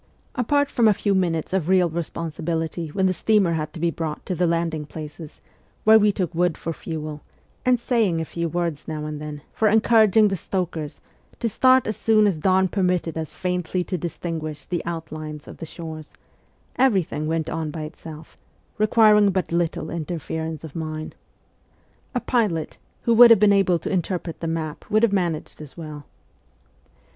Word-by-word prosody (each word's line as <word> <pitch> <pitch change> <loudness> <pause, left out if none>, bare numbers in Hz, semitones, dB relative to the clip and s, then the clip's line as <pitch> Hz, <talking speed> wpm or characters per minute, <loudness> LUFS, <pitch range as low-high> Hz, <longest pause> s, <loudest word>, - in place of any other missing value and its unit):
Apart 285 +3 +1
from 235 -2 +3
a 210 - +5
few 200 +1 0
minutes 175 -3 0
of 185 -3 0
real 185 -2 +4
responsibility 165 0 -3
when 190 +5 -1
the 185 - +3
steamer 200 -3 +2
had 155 -1 -2
to 170 - -8
be 170 +1 +1
brought 155 -1 -5
to 185 - -2
the 180 0 +1
landing 165 -2 0
places, 150 +1 -9 0.4
where 220 0 +7
we 210 0 +4
took 180 -3 -2
wood 175 -1 +1
for 165 - -4
fuel, 155 -2 -6 0.5
and 250 -1 +4
saying 225 -9 +1
a 160 - -2
few 170 +1 -3
words 170 -3 -2
now 155 -1 -4
and 150 -1 -5
then 150 -1 -7
for 220 - +2
encouraging 220 -1 +5
the 195 - -1
stokers 170 -5 -4 0.4
to 235 - 0
start 255 +3 +4
as 215 - -2
soon 215 -1 +4
as 190 -6 +1
dawn 190 +2 +3
permitted 180 -3 0
us 160 -2 -5
faintly 180 0 -1
to 185 - -3
distinguish 160 -3 -5
the 175 -2 -3
outlines 155 -2 -6
of - - -10
the 165 - -7
shores, 160 -2 -9 0.6
everything 190 - +1
went 160 0 -1
on 160 -1 -3
by 155 0 -5
itself, 155 0 -10 0.4
requiring 215 -1 +5
but 185 -2 -1
little 170 -1 -1
interference 160 -1 -4
of 155 -3 -9
mine. 155 -1 -5 1.0
A - - +2
pilot 210 -11 -1 0.2
who 235 - +3
would 240 +1 +9
have 230 -3 +7
been 205 0 +5
able 190 -3 +3
to 165 - -5
interpret 175 -2 -2
the 165 - -3
map 160 -2 -3
would 215 +1 +3
have 225 -4 +4
managed 170 -6 -2
as 150 +1 -11
well. 155 -3 -8
170 Hz, 175 wpm, -23 LUFS, 160-200 Hz, 1.0 s, would